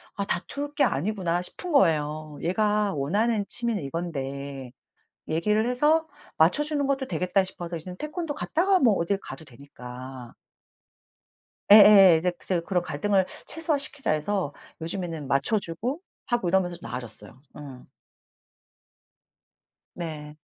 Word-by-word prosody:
'아 200 - -2
다툴 285 +10 -4
게 290 - +3
아니구나.' 175 - 0
싶은 345 - -7
거예요. 155 - +1
얘가 210 +3 +1
원하는 205 +10 0
취미는 235 -6 -2
이건데 140 -4 -5 0.6
'얘기를 210 +8 +1
해서 300 +6 +2 0.3
맞춰 165 - +4
주는 295 -2 -1
것도 270 -1 -1
되겠다.' 185 -3 +1
싶어서 175 -2 -7
이제는 180 +3 -9
태권도 305 - -4
갔다가 370 +5 +2
뭐 240 -9 +5
어딜 190 +3 0
가도 135 -5 -10
되니까. 125 -2 -10 1.4
예예예. 200 -4 +9
이제 180 +2 0
제가 175 -3 0
그런 180 -3 +1
갈등을 185 +4 +1 0.2
'최소화시키자.' 290 - -2
해서 155 -1 -1 0.3
요즘에는 165 -3 -4
맞춰 140 +11 +2
주고 220 - -4 0.3
하고 240 -8 0
이러면서 180 -1 +1
좀 - - -10
나아졌어요. 120 -1 -8 0.2
음. 135 -4 -10 2.1
네. 155 -3 -7
180 Hz, 295 characters per minute, -26 LUFS, 150-225 Hz, 2.1 s, 예예예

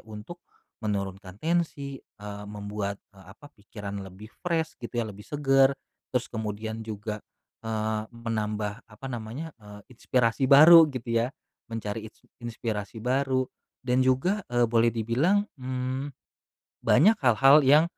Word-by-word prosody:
untuk 110 +12 -9 0.4
menurunkan 100 -2 -4
tensi, 150 -3 -2
eee, 105 0 -10
membuat, 100 -1 -4 0.2
eee, 95 -1 -17
apa, 145 0 -15
pikiran 100 -1 -7
lebih 95 +3 -11
fresh 165 -2 -1
gitu 120 0 -7
ya, 120 - +1
lebih 105 -1 -9
segar. 135 -2 +4 0.4
Terus 125 -1 0
kemudian 110 0 -4
juga, 105 0 -5 0.4
eee, 110 -1 -1
menambah, 110 -2 -3
apa 110 +5 -11
namanya, 125 +7 -6
eee, 105 -2 -12 0.2
inspirasi 125 +2 +1
baru 160 +4 +10
gitu 125 -2 -6 0.2
ya, - - -2 0.4
mencari 110 -1 -4
ins - - -31 0.2
inspirasi 110 -2 -4
baru 130 +1 +1 0.3
dan 125 0 +2
juga, 175 +11 +1
eee, 120 -1 +4
boleh 115 0 +3
dibilang, 135 - +1
mmm, 130 +2 -3 0.7
banyak 215 +8 +5
hal-hal 135 +5 +6
yang 145 +4 +6
115 Hz, 130 wpm, -27 LUFS, 105-135 Hz, 0.7 s, baru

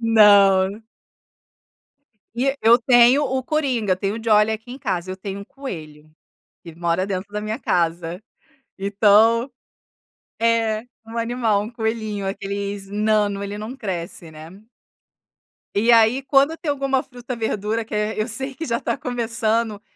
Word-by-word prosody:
Não. 205 -2 +5 1.5
E 250 +3 0
e 275 - -3
eu 230 +2 +6
tenho 245 +3 +5
o 260 -1 -1
coringa, 255 - 0
eu - - -5
tenho 195 +3 -2
o 225 - -9
Jolie 215 -1 +4
aqui 225 +3 -8
em 260 - -7
casa, 185 -6 -3
eu 190 - -7
tenho 195 +1 -6
um 200 - -9
coelho, 155 - -9 0.5
que 170 - -10
ele 165 - -17
mora 170 +2 0
dentro 195 +1 -5
da 210 - -3
minha 215 +2 -4
casa. 170 - -1 0.6
Então 215 +5 +3 0.9
é, 225 -1 +1 0.2
um 225 +1 -8
animal, 230 -3 0
um 215 - -7
coelhinho, 220 -3 -3
aqueles 200 0 -4
nano, 205 -1 0
ele 200 +1 -5
não 220 +5 -6
cresce, 185 -4 -6
né. 155 +1 -11 1.3
E 225 +4 +3
aí 230 +4 +4
quando 280 +4 +3
tem 320 - -4
alguma 270 -1 0
fruta, 245 0 -8
verdura, 220 0 -2
que 220 - -11
é 210 +1 -1
eu 215 - 0
sei 265 +4 -3
que 325 +5 -5
já 235 -1 -1
está - - -3
começando, 225 -3 -1
220 Hz, 155 wpm, -21 LUFS, 200-235 Hz, 1.5 s, eu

